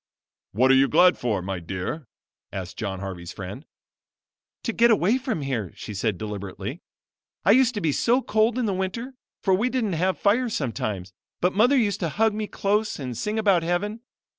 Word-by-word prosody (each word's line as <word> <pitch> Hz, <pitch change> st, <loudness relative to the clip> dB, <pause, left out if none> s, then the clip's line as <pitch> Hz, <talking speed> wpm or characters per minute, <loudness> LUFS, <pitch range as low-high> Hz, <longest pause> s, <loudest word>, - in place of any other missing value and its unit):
"What 130 Hz, +6 st, +4 dB
are -, -, +7 dB
you 135 Hz, +1 st, +5 dB
glad 180 Hz, +4 st, +5 dB
for, 105 Hz, -7 st, -1 dB
my 95 Hz, -1 st, -3 dB
dear?" 95 Hz, -, -5 dB, 0.4 s
asked 95 Hz, -1 st, -6 dB
John 95 Hz, -4 st, -4 dB
Harvey's 90 Hz, -3 st, -6 dB
friend. 100 Hz, -, -8 dB, 1.0 s
"To 230 Hz, -, -2 dB
get 235 Hz, +2 st, +5 dB
away 220 Hz, +3 st, +3 dB
from 245 Hz, -, -3 dB
here," 120 Hz, -9 st, -2 dB
she 105 Hz, -, -7 dB
said 105 Hz, -1 st, -1 dB
deliberately. 100 Hz, -2 st, -6 dB, 0.6 s
"I 195 Hz, -, +6 dB
used 250 Hz, +1 st, +4 dB
to 205 Hz, -, -2 dB
be 160 Hz, -, +2 dB
so 245 Hz, -, +2 dB
cold 220 Hz, +2 st, +2 dB
in 250 Hz, -, +1 dB
the 200 Hz, -, 0 dB
winter, 190 Hz, +8 st, -3 dB, 0.3 s
for 190 Hz, -, +3 dB
we 215 Hz, +7 st, +2 dB
didn't 235 Hz, -7 st, -1 dB
have 185 Hz, +3 st, +1 dB
fire 230 Hz, +4 st, +2 dB
sometimes; 105 Hz, -, -3 dB, 0.3 s
but 180 Hz, +1 st, +1 dB
mother 245 Hz, +7 st, +4 dB
used 205 Hz, -5 st, +1 dB
to 170 Hz, -, -1 dB
hug 220 Hz, +7 st, +2 dB
me 215 Hz, 0 st, -3 dB
close 210 Hz, +2 st, 0 dB
and 125 Hz, -4 st, -5 dB
sing 210 Hz, -, -2 dB
about 200 Hz, -5 st, +3 dB
heaven. 200 Hz, +7 st, -2 dB
180 Hz, 190 wpm, -25 LUFS, -, 1.0 s, are